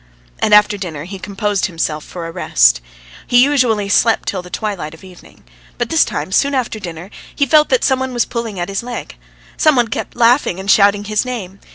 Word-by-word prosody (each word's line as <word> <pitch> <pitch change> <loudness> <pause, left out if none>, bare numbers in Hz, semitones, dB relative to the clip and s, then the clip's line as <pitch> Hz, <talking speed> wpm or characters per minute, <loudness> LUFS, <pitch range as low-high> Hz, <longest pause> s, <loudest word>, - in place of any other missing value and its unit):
And - - 0
after 210 0 +5
dinner 165 -7 -6
he 190 +3 -8
composed 200 +1 -2
himself 160 -4 -3
for 175 -2 -8
a 165 - -6
"rest." - - +3 0.5
He 245 0 +5
usually 250 -8 +1
slept 225 +3 +2
till 190 - -2
the 180 - -13
twilight 180 -6 -4
of 160 - -19
evening. 185 -2 -16 0.3
But - - -2
this - - +4
time 150 +5 -4
soon 280 +7 +2
after 240 -4 -2
dinner 175 0 -8 0.2
he 280 - +2
felt 300 +3 +4
that - - +2
some 265 -1 +2
one 260 0 -3
was 240 -1 0
pulling 230 -5 -5
at 175 - -2
his 195 0 -3
leg. 240 0 -7 0.4
Some 310 -2 +4
one 240 -3 +2
kept - - -5
laughing 235 -5 +2
and 195 +1 0
shouting 200 0 +4
his 210 0 -1
name. 205 -7 -6
205 Hz, 210 wpm, -17 LUFS, 180-240 Hz, 0.5 s, after